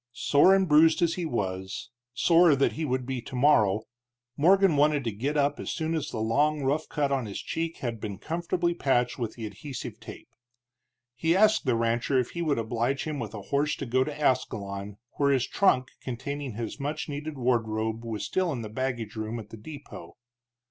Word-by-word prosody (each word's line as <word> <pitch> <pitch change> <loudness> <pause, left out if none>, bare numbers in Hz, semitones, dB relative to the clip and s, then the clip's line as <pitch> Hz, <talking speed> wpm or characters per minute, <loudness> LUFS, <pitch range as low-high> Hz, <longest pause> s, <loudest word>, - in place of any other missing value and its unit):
Sore 145 +9 +5
and 190 -1 +2
bruised 160 +2 +5
as 165 -1 +2
he 175 -3 -3
was, 95 -7 -4 0.2
sorer 165 +2 +5
that 135 - +2
he 160 - -3
would 130 -2 -1
be 130 -1 -3
tomorrow, 115 -6 +3 0.5
Morgan 190 +2 +4
wanted 145 0 +3
to 115 - -1
get 135 +9 -2
up 145 0 +1
as - - -5
soon 160 0 -2
as 160 -3 -2
the - - -5
long 145 +7 +1
rough 145 +4 0
cut 145 -2 0
on 130 -4 0
his 100 - -5
cheek 165 0 -3
had 115 -2 -3
been 100 -3 -5
comfortably 170 - -1
patched 125 -7 +1
with 115 -1 -4
adhesive 115 +5 -7
tape. - - -11 0.8
He 160 +7 +1
asked 215 -7 +4
the 125 - +3
rancher 115 +3 +1
if 125 -2 0
he 170 - -4
would 155 -4 +1
oblige 115 +4 -1
him 155 -2 -4
with 110 -3 -5
a 105 - -6
horse 145 +2 +2
to 140 - -5
go 130 +2 +2
to 150 +1 -6
Ascalon, 100 -7 -1 0.2
where 140 -1 +3
his 130 -3 +2
trunk 130 -10 +2
containing 135 +1 -5
his 115 +4 -5
much 145 +2 -3
needed 145 0 -5
wardrobe 110 -2 0
was 110 -3 -4
still 185 - 0
in 120 -5 -4
the 110 - -6
baggage 120 -2 -3
room 110 +1 -4
at 110 0 -11
the 115 - -8
depot. 145 +6 -10
135 Hz, 195 wpm, -27 LUFS, 115-155 Hz, 0.8 s, Sore